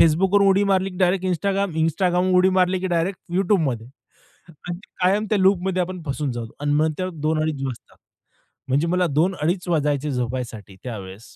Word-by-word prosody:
Facebookवरून 195 Hz, +5 st, +4 dB
उडी 195 Hz, +1 st, +4 dB
मारली 190 Hz, 0 st, +2 dB
की 180 Hz, -, -11 dB
डायरेक्ट 185 Hz, 0 st, +2 dB
Instagram, 195 Hz, 0 st, 0 dB
Instagramवर 180 Hz, +2 st, +2 dB
उडी 185 Hz, +1 st, +5 dB
मारली 180 Hz, 0 st, +2 dB
की 190 Hz, -, -2 dB
डायरेक्ट 170 Hz, +3 st, 0 dB, 0.2 s
YouTubeमध्ये 160 Hz, -, +1 dB, 0.8 s
आणि 175 Hz, 0 st, -3 dB, 0.2 s
कायम 200 Hz, +4 st, +2 dB
त्या 210 Hz, -, +3 dB
लूपमध्ये 190 Hz, -1 st, +2 dB
आपण 180 Hz, -1 st, -5 dB
फसून 140 Hz, -1 st, -2 dB
जाऊ 120 Hz, -1 st, -5 dB
आणि 145 Hz, 0 st, 0 dB
मग 155 Hz, +1 st, +2 dB
त्यामुळे 185 Hz, -4 st, -4 dB
2 155 Hz, 0 st, +1 dB
अडीच 150 Hz, -3 st, -2 dB
वाजतात. 130 Hz, -3 st, -7 dB, 0.7 s
म्हणजे 145 Hz, +6 st, +2 dB
मला 180 Hz, 0 st, +2 dB
2 165 Hz, +6 st, +1 dB
अडीच 175 Hz, +4 st, -1 dB
वाजायचे 150 Hz, -3 st, 0 dB
झोपायसाठी 120 Hz, -5 st, -4 dB
त्यावेळेस. 105 Hz, -2 st, -8 dB
175 Hz, 170 wpm, -22 LUFS, 145-185 Hz, 0.8 s, उडी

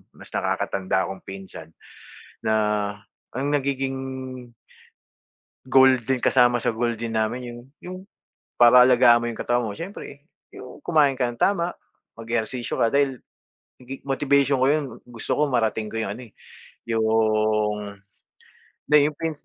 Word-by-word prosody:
mas -, -, -13 dB
nakakatanda 95 Hz, -1 st, -1 dB
kong 95 Hz, -, -11 dB
pinsan 95 Hz, -4 st, -9 dB, 0.7 s
na 110 Hz, -, -1 dB, 0.8 s
ang 135 Hz, +3 st, -2 dB
nagiging 135 Hz, -2 st, -1 dB, 1.7 s
goal 130 Hz, 0 st, +5 dB
din, 125 Hz, +1 st, -2 dB
kasama 120 Hz, -2 st, +3 dB
sa -, -, +1 dB
goal 120 Hz, +1 st, -1 dB
din 115 Hz, 0 st, -4 dB
namin 110 Hz, +3 st, -1 dB
yung 120 Hz, -, -9 dB, 0.2 s
yung 185 Hz, +1 st, -7 dB, 0.6 s
para 120 Hz, +1 st, +8 dB
alagaan 120 Hz, -2 st, +5 dB
mo 120 Hz, -, -2 dB
yung 115 Hz, -, -10 dB
katawan 120 Hz, 0 st, 0 dB
mo, 110 Hz, -, -3 dB
siyempre 150 Hz, -, -9 dB, 0.2 s
yung 125 Hz, -, -12 dB
kumain 150 Hz, -5 st, +3 dB
ka 130 Hz, -, -1 dB
nang 120 Hz, -, -14 dB
tama, 180 Hz, -3 st, +1 dB, 0.5 s
mag-ehersisyo 115 Hz, +1 st, -3 dB
ka 115 Hz, -, +1 dB
dahil 140 Hz, -3 st, 0 dB, 0.6 s
nagi 130 Hz, +2 st, -8 dB
motivation 140 Hz, -1 st, +2 dB
ko -, -, +4 dB
yun, 150 Hz, 0 st, +1 dB, 0.2 s
gusto 120 Hz, -2 st, -4 dB
ko 150 Hz, -1 st, +1 dB
marating 110 Hz, -3 st, 0 dB
ko 115 Hz, -, -4 dB
yung 100 Hz, -2 st, -3 dB
ano 125 Hz, -, -10 dB
eh, -, -, -41 dB, 0.6 s
yung 110 Hz, -2 st, +1 dB, 1.0 s
hindi 150 Hz, -, +8 dB
yung 150 Hz, -, -5 dB
pin 165 Hz, +1 st, -3 dB
120 Hz, 140 wpm, -23 LUFS, 110-135 Hz, 1.7 s, para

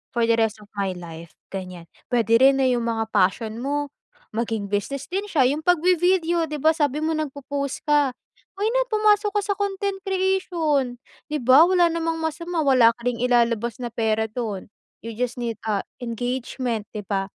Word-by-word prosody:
for 235 Hz, -, +2 dB
the 230 Hz, 0 st, +3 dB
rest 220 Hz, -1 st, 0 dB
of 205 Hz, -, -21 dB
my 190 Hz, -2 st, -1 dB
life 165 Hz, -1 st, -10 dB, 0.2 s
ganyan. 185 Hz, -3 st, -6 dB, 0.2 s
Pwede 230 Hz, -2 st, +3 dB
rin 270 Hz, +1 st, +6 dB
'no 270 Hz, -, +1 dB
yung 245 Hz, -2 st, +1 dB
mga 225 Hz, -1 st, -2 dB
passion 215 Hz, +3 st, +1 dB
mo 290 Hz, +2 st, -2 dB, 0.4 s
maging 220 Hz, -3 st, -3 dB
business 250 Hz, +7 st, -3 dB
din 390 Hz, +3 st, -2 dB
siya 325 Hz, -9 st, +1 dB
yung 305 Hz, +4 st, -3 dB
'pag 355 Hz, -3 st, +3 dB
vi-video 350 Hz, -1 st, +2 dB
di 300 Hz, -2 st, -6 dB
ba? 315 Hz, -, +5 dB
Sabi 300 Hz, -2 st, 0 dB
mo 315 Hz, 0 st, 0 dB
nagpopost 280 Hz, -2 st, -4 dB
ka, 290 Hz, -4 st, +2 dB, 0.4 s
why 405 Hz, +3 st, -1 dB
not -, -, +2 dB
pumasok 420 Hz, -1 st, +3 dB
ka 415 Hz, -, +1 dB
sa 405 Hz, -1 st, -2 dB
content 400 Hz, -1 st, -2 dB
creation 340 Hz, -10 st, 0 dB, 0.2 s
di 300 Hz, -3 st, -3 dB
ba 260 Hz, +7 st, +7 dB
wala 355 Hz, -2 st, +4 dB
namang 330 Hz, 0 st, -2 dB
masama, 330 Hz, +1 st, -2 dB
wala 255 Hz, -5 st, +5 dB
ka 235 Hz, -, -21 dB
ring 235 Hz, -, -4 dB
ilalabas 235 Hz, 0 st, +1 dB
na 240 Hz, -, -3 dB
pera 220 Hz, -1 st, 0 dB
do'n. 215 Hz, -5 st, -5 dB, 0.3 s
You 230 Hz, -1 st, -8 dB
just 250 Hz, 0 st, -2 dB
need, 230 Hz, -3 st, -3 dB
ah, 205 Hz, -3 st, 0 dB, 0.2 s
engagement 245 Hz, -1 st, -3 dB
di 210 Hz, -, -4 dB
ba, 195 Hz, -1 st, -2 dB
260 Hz, 185 wpm, -23 LUFS, 225-325 Hz, 0.4 s, ba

